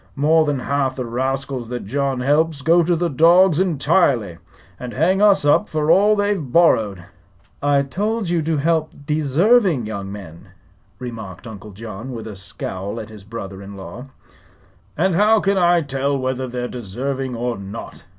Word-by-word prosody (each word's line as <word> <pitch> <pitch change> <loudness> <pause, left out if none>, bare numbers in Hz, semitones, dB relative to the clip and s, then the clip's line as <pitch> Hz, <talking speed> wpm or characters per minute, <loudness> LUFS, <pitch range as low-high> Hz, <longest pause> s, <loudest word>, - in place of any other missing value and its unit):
"More 155 +3 +3
than 145 -3 -1
half 135 -1 -1
the 130 - -4
rascals 130 0 -3
that 120 -4 -5
John 135 +3 -1
helps 145 +1 +1
go 170 +3 +5
to 170 +1 +1
the 175 +1 0
dogs 170 +3 +5
entirely, 140 - +1 0.4
and 125 -1 -7
hang 180 +8 +2
us 205 -7 +4
up 145 +8 +3
for 155 0 +1
all 205 +3 +5
they've 205 -2 0
borrowed." 115 - +2 0.6
"I 140 -1 +2
told 205 +9 -2
you 170 -1 +1
to 160 0 -1
help 160 +1 0
deserving 155 - +2
young 100 -2 -5
men," 90 -5 -11 0.4
remarked 110 -7 -8
Uncle 110 -2 -9
John, 110 +4 -8
with 115 -2 -7
a 110 -2 -7
scowl 95 +2 -6
at 110 - -8
his 105 -2 -12
brother 100 -3 -8
in 100 0 -10
law. 95 +7 -9 0.9
"And 185 +4 +2
how 210 +5 +4
can 195 -1 +1
I 175 -1 +4
tell 140 -1 -1
whether 130 0 -2
they're 125 0 -4
desarving 125 +3 -4
or 120 0 -2
not?" 100 +3 -9
135 Hz, 165 wpm, -20 LUFS, 115-165 Hz, 0.9 s, go